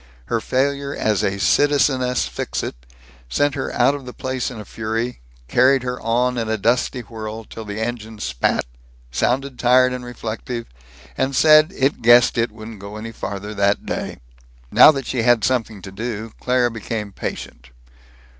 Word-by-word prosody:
Her - - +1
failure 140 +2 -1
as 105 -3 +1
a 100 +1 0
Citizeness 130 -1 +2
Fixit - - -4 0.5
sent 145 - +1
her 135 -1 -3
out 125 +3 +3
of 140 -3 -7
the 125 - -7
place 130 0 -2
in 125 -4 -8
a 105 - -8
fury, 115 +4 -3 0.3
carried 130 - +4
her 125 0 -4
on 120 +2 +1
in 115 -1 -2
a 110 - 0
dusty 120 +4 +1
whirl 110 -1 -7
till 110 +1 -9
the 105 +1 -5
engine 110 -1 -4
spat, 65 -9 0 0.5
sounded 130 - -1
tired 125 +1 +4
and 125 -1 -5
reflective, 115 0 -5 0.5
and 135 +1 -1
said 155 +3 +6
it 135 +2 +1
guessed 120 +1 +6
it 115 -1 +1
wouldn't 110 0 -10
go 100 +2 -9
any 110 +1 -6
farther 100 -1 -6
that 100 0 +1
day. - - -4 0.5
Now - - +9
that 135 -4 -4
she 125 -1 -1
had 120 -2 +3
something 110 -6 -1
to 95 - -8
do, 110 +1 -5
Claire 125 -1 +1
became 110 -1 -5
patient. - - -7
120 Hz, 165 wpm, -21 LUFS, 110-130 Hz, 0.5 s, Now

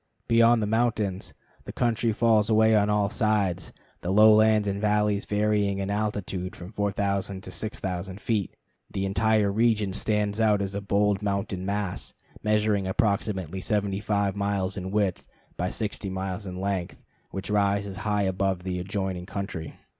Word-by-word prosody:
Beyond 115 0 +5
the - - +1
mountains 110 -3 -1 0.3
the - - -6
country 115 -1 +1
falls 110 -1 +3
away 110 0 +5
on 105 0 +3
all 105 -1 +1
sides, 100 -8 0 0.3
the 90 - -4
lowlands 110 +1 +6
and 100 0 -2
valleys 105 -1 +1
varying 105 -1 +1
in 100 0 -2
altitude 100 -3 -2
from 90 +2 -10
4000 100 -2 -1
to 95 - -7
6000 95 -1 -4
feet. 105 -4 -1 0.3
The 95 - -2
entire 105 +1 +2
region 110 -2 +2
stands 105 +1 0
out 105 -2 +4
as 100 0 -3
a 100 - -3
bold 100 0 +1
mountain 100 -2 -2
mass, 100 -2 -3 0.3
measuring 105 -2 +1
approximately 95 -3 -1
75 100 -1 0
miles 100 -2 -1
in 95 -1 -4
width 100 -2 -1 0.3
by - - -1
60 105 -2 -3
miles 95 +1 -4
in 90 0 -6
length, 95 -2 -3 0.2
which 95 +2 -5
rises 100 -1 +1
high 105 -1 0
above 95 -1 0
the 90 -1 -3
adjoining 95 -1 -3
country. 95 -5 -5
100 Hz, 150 wpm, -26 LUFS, 95-105 Hz, 0.3 s, lowlands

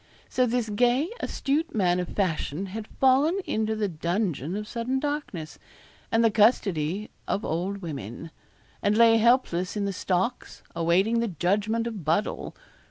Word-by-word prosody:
So 255 -1 +2
this 240 -1 0
gay, 245 - +2
astute 300 +2 -1
man 180 -4 +2
of 180 - -2
fashion 180 -2 -1
had 220 0 -5
fallen 275 +7 +3
into 220 0 -1
the 215 -1 0
dungeon 170 - -2
of 210 0 -4
sudden 245 +4 -2
darkness, 290 - -4 0.5
and 225 +1 +3
the 225 - +4
custody 205 -4 +2 0.2
of 205 - -1
old 185 +5 -2
women; 145 - -6 0.5
and 205 +1 +2
lay 230 -1 +7
helpless 220 -6 +2
in 205 - 0
the 200 - -2
stocks, 190 +6 -2
awaiting 185 +8 +2
the 235 - 0
judgment 210 +6 0
of 220 -6 -5
Buddle. 165 +8 -1
210 Hz, 150 wpm, -26 LUFS, 175-235 Hz, 0.5 s, lay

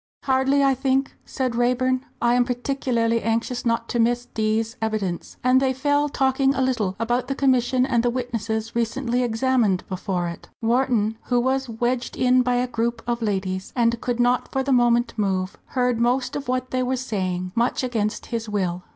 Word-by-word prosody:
"Hardly, 270 +1 +2
I 275 -1 +4
think," 265 +1 0
said 255 -3 -2
Raeburn, 255 +2 +1 0.2
"I 240 0 +4
am 245 0 +4
particularly 245 -2 0
anxious 230 +2 -1
not 230 0 0
to 240 - -1
miss 240 +1 +2
D 220 -2 0
's 225 +1 -4
evidence." 210 -6 -3
And 255 +1 +4
they 265 -1 +2
fell 285 +2 +1
talking 270 0 +2
a 265 - 0
little 225 -8 0
about 240 +3 -1
the 275 - -2
Commission 255 -2 +2
and 240 -3 +2
the 240 - +1
witnesses 230 -3 -3
recently 235 +1 0
examined 235 -4 +1
before 185 -1 -2
it. 170 - -8
Wharton, 230 -2 +1
who 245 -1 +2
was 265 +1 0
wedged 240 +2 -2
in 255 0 +4
by 250 0 +1
a 245 +1 +1
group 235 -1 -2
of 240 0 -2
ladies, 190 -3 -2
and 235 -1 +1
could 245 -1 -2
not 245 +1 +2
for 265 - 0
the 270 0 +1
moment 240 -1 +3
move, 190 -2 -1
heard 250 -2 0
most 245 +2 +1
of 285 -1 -4
what 255 0 -2
they 255 - 0
were 255 +1 0
saying, 185 -7 -3
much 240 +2 +1
against 220 -4 -2
his 230 -2 -4
will. 185 -4 -1
240 Hz, 185 wpm, -23 LUFS, 225-255 Hz, 0.2 s, I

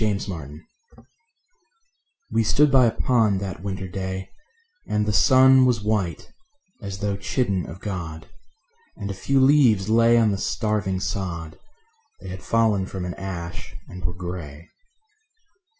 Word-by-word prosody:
Neutral 105 -2 0
Tones 75 +1 -11 1.7
We 115 - +2
stood 145 +6 +3
by 130 -3 +6
a - - +2
pond 110 -5 +1
that 95 -3 -5
winter 95 -1 -4
day, 95 +1 -5 0.6
And 105 0 0
the 105 - -1
sun 130 +2 +6
was 120 -4 +2
white, 105 -5 -1 0.5
as 100 -2 -6
though 100 -1 -1
chidden 95 - -1
of 85 +4 -10
God, 80 -6 -6 0.7
And 100 -1 -4
a - - -4
few 135 +8 0
leaves 130 -8 +4
lay 115 +1 +5
on 110 -2 +3
the 100 - -2
starving 105 -5 -1
sod; 85 -6 -4 0.6
They 95 - -9
had 90 0 -7
fallen 110 -4 +1
from 95 -2 -5
an 90 - -4
ash, 85 -3 -7
and 90 -1 -10
were 90 - -2
gray. 85 -4 -7
100 Hz, 145 wpm, -23 LUFS, 90-110 Hz, 1.7 s, by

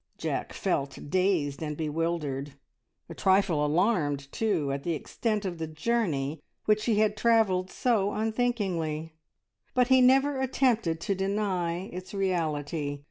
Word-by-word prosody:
Jack - - -3
felt 140 0 -1
dazed 180 -7 +1
and 150 -2 -3
bewildered, 150 -3 -2 0.5
a - - -8
trifle 190 -5 +2
alarmed, 150 -4 +1
too, 180 -11 0
at 140 0 -2
the 170 +3 -1
extent 215 - -2
of 175 -3 -4
the 160 - -3
journey 155 -5 -1 0.2
which 215 0 +2
he 230 - +2
had 210 0 +2
travelled 210 -5 +2
so 210 -5 +1
unthinkingly, 205 -9 -1 0.6
but 250 0 +3
he 260 -1 +6
never 270 +2 +4
attempted 240 -10 +1
to 195 - 0
deny 190 -3 -1
its 185 +2 -7
reality. 155 -6 -1
185 Hz, 135 wpm, -28 LUFS, 155-215 Hz, 0.6 s, he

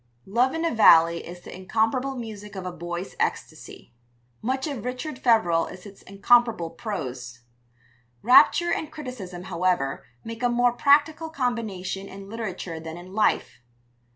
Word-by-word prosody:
Love 245 +8 +1
in 325 +1 -1
a 330 - 0
Valley 170 -6 +6
is 175 +1 -10
the - - -10
incomparable 225 +8 -1
music 210 -4 -8
of 190 -1 -6
a 180 - -3
boy's 175 +2 -6
ecstasy. - - -4 0.5
Much 260 +3 -1
of 275 -9 -5
Richard 255 +3 -5
Feverel 180 -10 +3
is 185 +1 -11
its 200 -1 -13
incomparable 210 -3 +2
prose. 130 - -6 0.8
Rapture 245 +8 +6
and 310 - -3
criticism, 245 - -8
however, 180 -6 -1 0.2
make 230 +1 -8
a 245 - +2
more 245 0 +2
practical 295 +5 +3
combination 220 - -3
in 195 0 -10
literature 185 -7 -5
than 160 +1 -8
in 180 +2 -11
life. 215 - 0
210 Hz, 145 wpm, -25 LUFS, 180-250 Hz, 0.8 s, Valley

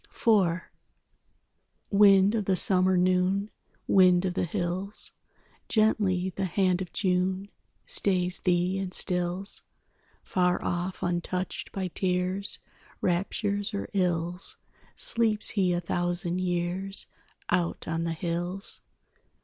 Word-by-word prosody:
IV 185 -6 +2 1.3
Wind 200 0 +6
of 215 -3 -1
the 190 - +2
summer 185 -2 +3
noon, 185 +3 +1 0.4
Wind 185 -1 +5
of 180 - -1
the 180 - -1
hills, 185 +3 +1 0.6
Gently 200 -4 +2
the 195 - -1
hand 185 0 +1
of 180 - -6
June 185 +1 0 0.4
Stays 180 -2 0
thee 180 +1 +1
and 190 -1 -3
stills. 180 +1 0 0.6
Far 180 -1 +1
off, 175 +1 -3
untouched 175 +1 -3
by 190 -2 -3
tears, 185 +2 0 0.4
Raptures 200 +3 -1
or 200 - -4
ills, 180 -1 0 0.4
Sleeps 220 -2 +1
he 190 -4 +1
a 175 - +1
thousand 175 0 -2
years 180 +2 0 0.5
Out 175 -1 -1
on 165 0 -1
the 165 -1 -1
hills. 175 +4 -3
185 Hz, 110 wpm, -27 LUFS, 175-195 Hz, 1.3 s, Wind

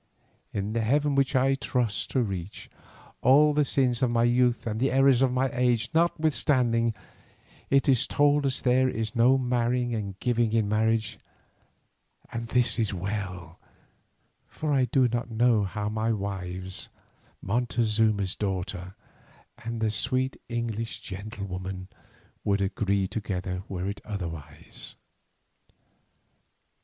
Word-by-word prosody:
In 100 +1 -3
the 115 - 0
heaven 145 +6 +2
which 135 0 +1
I 135 +1 +3
trust 125 -5 -1
to 130 - +1
reach, 95 -3 -6 0.5
all 150 +3 +5
the 150 0 +3
sins 130 -3 +1
of 130 - +3
my 120 0 +2
youth 120 0 +2
and 110 -1 -2
the 135 +2 +1
errors 135 -1 +4
of 135 -2 +3
my 130 0 0
age 125 -1 +1
notwithstanding, 140 -8 +2 0.7
it 135 0 +3
is 130 0 +3
told 145 -1 +3
us 130 - -1
there 130 +1 +3
is 110 0 -3
no 125 +3 +5
marrying 125 -1 0
and 100 -4 -4
giving 120 -2 +1
in 110 -2 +2
marriage; 110 +1 0 1.1
and 115 0 -4
this 125 0 +1
is 105 -3 0
well, 90 -3 -5 0.9
for 155 -2 -3
I 130 -2 +3
do 130 0 +3
not 120 0 -3
know 115 -2 +3
how 105 +2 -3
my 110 +2 0
wives, 95 -3 -5 0.5
Montezuma's 110 -3 +1
daughter 95 -2 -4 0.7
and 115 0 -4
the 110 -1 +1
sweet 130 +4 0
English 115 -1 -3
gentlewoman, 95 -2 -6 0.5
would 100 0 +1
agree 100 0 0
together 90 -3 -4
were 95 -1 -3
it 100 +1 -5
otherwise. 80 -8 -8
115 Hz, 130 wpm, -27 LUFS, 100-125 Hz, 1.1 s, all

